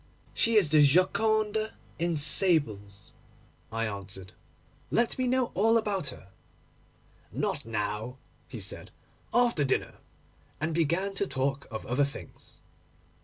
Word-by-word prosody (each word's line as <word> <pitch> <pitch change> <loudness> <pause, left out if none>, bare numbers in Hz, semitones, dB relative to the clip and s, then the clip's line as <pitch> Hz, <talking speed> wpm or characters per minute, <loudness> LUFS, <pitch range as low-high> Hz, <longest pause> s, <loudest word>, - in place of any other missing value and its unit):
'She 230 0 +2
is 195 -8 +5
the 155 -1 +6
Gioconda 215 +7 +2 0.2
in 170 -1 0
sables,' 125 - +3 0.6
I 115 +1 -1
answered. 95 -3 -7 0.6
'Let 235 0 +1
me 255 - +1
know 255 -1 +1
all 225 +4 +3
about 200 -8 -1
her.' 120 -7 -7 1.0
'Not - - -3
now,' 110 +3 -3 0.3
he - - -8
said; - - -4 0.4
'after 240 -11 +2
dinner,' 135 - -1 0.6
and 155 +2 -2
began 170 +5 0
to 195 0 -1
talk 135 0 -2
of 110 -2 -6
other 125 +4 +1
things. 140 - -8
155 Hz, 120 wpm, -28 LUFS, -, 1.0 s, the